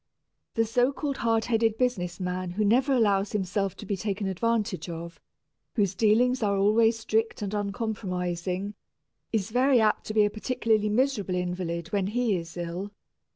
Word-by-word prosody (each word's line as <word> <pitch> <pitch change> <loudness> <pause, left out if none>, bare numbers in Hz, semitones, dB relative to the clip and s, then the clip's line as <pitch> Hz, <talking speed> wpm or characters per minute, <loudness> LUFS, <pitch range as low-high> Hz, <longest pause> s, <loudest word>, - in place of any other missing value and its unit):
The 225 - +3
so 245 +4 +2
called 280 -1 -3
hard 225 -2 +1
headed 225 -2 +1
business 185 -9 -1
man 180 0 -3
who 205 +4 -1
never 250 +7 +3
allows 205 -6 +2
himself 195 -1 -1
to - - -9
be 200 - -1
taken 200 +1 -3
advantage 195 -3 -1
of, 170 0 -7 0.6
whose 200 -5 +2
dealings 235 +5 +3
are 200 -2 +1
always 225 +3 +4
strict 225 -1 -1
and 200 0 -3
uncompromising, 195 -3 -2 0.6
is 215 -1 -1
very 255 +2 +4
apt 215 -1 +1
to 215 - -4
be 210 -1 +5
a 205 - 0
particularly 220 -2 0
miserable 215 -5 +1
invalid 175 -2 -3
when 195 -1 0
he 230 -1 +1
is 165 -1 -6
ill. 175 +4 -4
210 Hz, 160 wpm, -27 LUFS, 185-225 Hz, 0.6 s, be